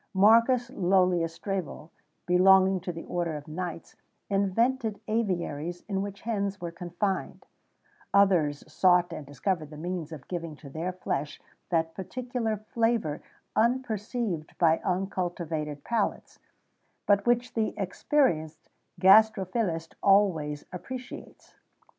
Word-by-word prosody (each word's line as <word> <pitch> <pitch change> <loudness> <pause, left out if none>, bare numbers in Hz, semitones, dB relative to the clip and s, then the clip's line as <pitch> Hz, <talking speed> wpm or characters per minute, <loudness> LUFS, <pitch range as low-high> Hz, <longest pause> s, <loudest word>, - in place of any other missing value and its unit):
Marcus 230 +5 +5
Lœlius 180 -5 +2
Strabo, 175 -2 -5 0.3
belonging 190 +1 +5
to 180 0 -4
the 165 -1 -8
order 170 -3 -2
of 145 +1 -11
knights, 170 +1 -6 0.4
invented 215 +3 +1
aviaries 175 -6 -2
in 195 -2 -1
which 200 0 -6
hens 200 -3 -2
were 170 -1 -5
confined;[XVII 175 +3 -3 0.7
21] 200 0 +7
others 155 -7 0
sought 180 -1 +4
and 145 - -7
discovered 155 +3 -2
the 150 - -10
means 170 -1 -4
of 145 -5 -9
giving 170 -3 -5
to 140 -2 -12
their 165 +5 -3
flesh 150 -5 -3 0.3
that 165 -1 0
particular 240 +2 -3
flavour 220 -7 -1 0.3
unperceived 220 -6 -1
by 165 -2 +4
uncultivated 175 -5 -2
palates, 230 -3 -2 0.7
but 205 +2 +3
which 240 +1 +2
the 220 -1 -1
experienced 170 - 0 0.3
gastrophilist 190 -4 +4
always 170 -8 +3
appreciates. 250 +7 -9
185 Hz, 115 wpm, -28 LUFS, 165-215 Hz, 0.7 s, 21